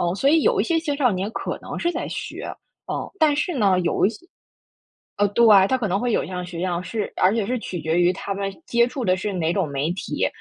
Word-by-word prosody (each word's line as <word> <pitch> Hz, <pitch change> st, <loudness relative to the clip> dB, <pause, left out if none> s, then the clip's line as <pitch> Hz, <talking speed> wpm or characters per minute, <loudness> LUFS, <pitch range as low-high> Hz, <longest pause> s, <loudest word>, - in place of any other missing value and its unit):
嗯， 175 Hz, +1 st, 0 dB
所 270 Hz, +8 st, +1 dB
以 315 Hz, +1 st, +4 dB
有 460 Hz, -2 st, +3 dB
一 -, -, +1 dB
些 335 Hz, -2 st, +1 dB
青 310 Hz, -3 st, -2 dB
少 265 Hz, -4 st, +3 dB
年 190 Hz, +1 st, -2 dB
可 -, -, -4 dB
能 -, -, -6 dB
是 345 Hz, -, 0 dB
在 -, -, -3 dB
学， -, -, -6 dB, 0.5 s
嗯。 -, -, -3 dB
但 310 Hz, -3 st, +4 dB
是 300 Hz, +3 st, -1 dB
呢， 195 Hz, -7 st, +3 dB
有 175 Hz, +1 st, +1 dB
一 200 Hz, -, +4 dB
些 350 Hz, +9 st, -14 dB, 0.9 s
呃， 205 Hz, -, +3 dB
对， 235 Hz, +4 st, +4 dB, 0.2 s
他 260 Hz, -, +1 dB
可 230 Hz, -, -1 dB
能 195 Hz, +2 st, +1 dB
会 240 Hz, -1 st, 0 dB
有 -, -, +2 dB
样 180 Hz, -1 st, -5 dB
学 175 Hz, -1 st, -7 dB
样， 180 Hz, -1 st, -1 dB
是 210 Hz, +4 st, -3 dB
而 190 Hz, +4 st, +3 dB
且 220 Hz, -4 st, 0 dB
是 250 Hz, +3 st, -1 dB
取 180 Hz, -5 st, -5 dB
决 160 Hz, +2 st, 0 dB
于 175 Hz, +1 st, +4 dB
他 195 Hz, +1 st, -5 dB
们 195 Hz, 0 st, -2 dB, 0.2 s
接 235 Hz, 0 st, +3 dB
触 250 Hz, 0 st, -4 dB
的 185 Hz, -, +3 dB
是 200 Hz, +2 st, -3 dB
哪 170 Hz, -3 st, 0 dB
种 190 Hz, -4 st, +1 dB
媒 140 Hz, +3 st, -1 dB
体， 190 Hz, -, -2 dB
200 Hz, 275 characters per minute, -23 LUFS, 180-255 Hz, 0.9 s, 以